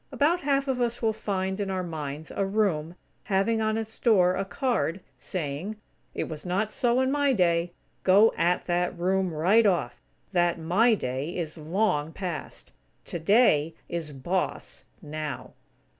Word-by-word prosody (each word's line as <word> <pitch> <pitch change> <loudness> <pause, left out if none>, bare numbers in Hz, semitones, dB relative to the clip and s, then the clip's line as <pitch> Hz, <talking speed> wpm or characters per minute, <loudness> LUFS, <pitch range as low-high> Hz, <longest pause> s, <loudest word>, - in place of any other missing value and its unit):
About 320 +5 +2
half 275 -1 +1
of 255 -2 0
us 240 0 0
will 220 -1 +2
find, 190 -2 -2
in 200 -1 -2
our 185 -1 -1
minds, 155 -2 -6
a 200 - -1
room, 195 -5 0 0.3
having 210 +3 +1
on 220 0 +1
its 220 0 -5
door 185 -6 +4
a 195 - -1
card, 195 - -1 0.2
saying: 170 +4 -4 0.4
"It - - -1
Was 155 -2 -7
Not 195 +4 -1
So 245 +1 +2
In 260 0 +1
My 285 -1 +2
Day." 170 -4 +2 0.3
Go 200 +4 +6
at 175 +1 +1
that 175 0 0
room, 185 +1 +1
right 190 +8 +4
off. 120 -11 0 0.3
That 175 -2 +2
"My 195 +9 +3
Day" 135 +1 -3
is 160 -3 -3
long 160 -1 0
past. 180 -5 -6 0.3
"Today" 165 -3 +3
is 165 -3 -4
boss, 175 +7 -3 0.2
now. 150 -2 -5
185 Hz, 155 wpm, -27 LUFS, 165-220 Hz, 0.4 s, Go